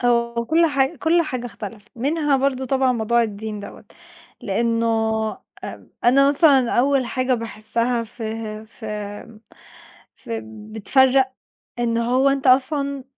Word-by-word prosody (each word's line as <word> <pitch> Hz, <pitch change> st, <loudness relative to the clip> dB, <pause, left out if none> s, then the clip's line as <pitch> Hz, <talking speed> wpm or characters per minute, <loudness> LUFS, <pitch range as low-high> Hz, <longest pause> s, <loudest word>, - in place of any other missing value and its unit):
هو 235 Hz, -1 st, +1 dB
كل 330 Hz, +4 st, +4 dB
حاجة 275 Hz, +1 st, +1 dB
كل 330 Hz, +5 st, +2 dB
حاجة 255 Hz, -5 st, -4 dB
اختلفت 210 Hz, -2 st, -9 dB
منها 290 Hz, +3 st, +1 dB
برضه 265 Hz, -1 st, 0 dB
طبعًا 260 Hz, 0 st, +2 dB
موضوع 235 Hz, +1 st, +2 dB
الدين 210 Hz, -1 st, -5 dB
دوّة، 200 Hz, -, -10 dB, 0.6 s
لأنه 230 Hz, +3 st, 0 dB, 0.8 s
أ -, -, -9 dB, 0.2 s
أنا 275 Hz, +3 st, +5 dB
مثلًا 280 Hz, -4 st, +4 dB
أول 265 Hz, 0 st, +2 dB
حاجة 255 Hz, +1 st, 0 dB
باحسّها 230 Hz, +1 st, -2 dB
فه 220 Hz, -1 st, -6 dB
ف 220 Hz, +1 st, -15 dB, 1.3 s
فب 110 Hz, -, -8 dB
بتفرّق 260 Hz, +4 st, +3 dB, 0.5 s
إن 235 Hz, -1 st, 0 dB
هو 250 Hz, +4 st, +2 dB
أنت 275 Hz, -1 st, 0 dB
أصلًا 275 Hz, +1 st, +2 dB
245 Hz, 125 wpm, -22 LUFS, 225-275 Hz, 1.3 s, أنا